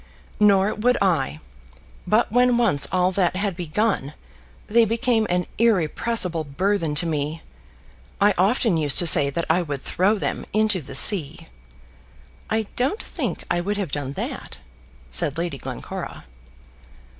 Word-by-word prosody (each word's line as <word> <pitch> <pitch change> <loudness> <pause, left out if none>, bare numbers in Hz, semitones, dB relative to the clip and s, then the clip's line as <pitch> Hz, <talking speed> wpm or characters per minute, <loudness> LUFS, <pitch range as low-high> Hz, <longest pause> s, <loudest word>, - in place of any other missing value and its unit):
"Nor 200 -1 +4
would 245 +4 +1
I. 155 -5 0 0.7
But - - +2
when 245 +1 +3
once 205 - +1
all 180 0 +1
that 185 -1 0
had 195 -1 -2
begun, 175 -3 -2 0.5
they 230 +2 +3
became 230 0 0
an 180 0 0
irrepressible 190 -3 0
burthen 165 +2 -1
to 160 - +3
me. 155 0 -3 0.8
I 205 +1 +4
often 200 0 +2
used 145 -4 0
to 175 - +4
say 145 -4 +6
that 170 +4 -3
I 170 +3 +2
would 145 -5 -5
throw 200 +4 +1
them - - -3
into 215 -3 +2
the 135 - -8
sea." 165 -1 +4 1.0
"I 220 0 0
don't 270 - -1
think - - -4
I 175 0 +1
would 205 +3 -3
have 195 -8 -3
done 140 -1 -4
that," - - -6 0.5
said 130 - 0
Lady 170 -5 -3
Glencora. - - -7
180 Hz, 145 wpm, -22 LUFS, 155-215 Hz, 1.0 s, say